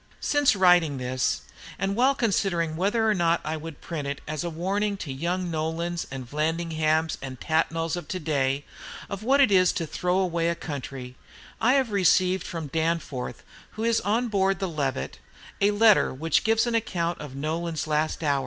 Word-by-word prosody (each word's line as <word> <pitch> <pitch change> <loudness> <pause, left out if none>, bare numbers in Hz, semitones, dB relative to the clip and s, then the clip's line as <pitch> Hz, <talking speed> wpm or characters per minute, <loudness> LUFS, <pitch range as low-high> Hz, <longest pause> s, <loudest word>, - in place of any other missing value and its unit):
Since 290 -5 +3
writing 180 -6 +4
this, 130 0 -1 0.4
and 195 0 -1
while 260 +4 +3
considering 180 - 0
whether 210 +6 +1
or 215 - +4
no 170 -3 +2
I 155 +1 -2
would 160 -1 -8
print 150 -4 -4
it, 140 0 -3
as 155 0 -3
a 170 - -2
warning 200 +5 -1
to - - -6
the 140 - -5
young 175 +5 -2
Nolans 165 +2 -2
and 130 -2 -7
Vallandighams 160 +1 0
and 130 -2 -7
Tatnalls 165 +1 0
of 175 - -6
to 185 - -3
day 140 -3 0 0.5
of 200 0 -4
what 265 +5 +3
it 270 -7 +5
is 185 -2 +5
to 165 - -2
throw 180 +3 -1
away 170 -3 +1
a 170 - 0
country, 135 -5 -7 0.4
I 245 +3 +4
have 265 -5 +2
received 185 -1 +3
from 165 -2 -5
Danforth, 160 -3 -2 0.3
who 220 - -5
is 230 0 +2
on 230 +4 +1
board 195 -3 +1
the 190 - -2
"Levant," 145 -6 -3 0.4
a 200 - +5
letter 210 0 +5
which 155 +4 0
gives 225 +1 +3
an 240 - -1
account 175 -7 -1
of 145 -3 -8
Nolan's 160 +3 -2
last 155 +1 -1
hours. 145 -2 +2
170 Hz, 185 wpm, -26 LUFS, 155-195 Hz, 0.5 s, it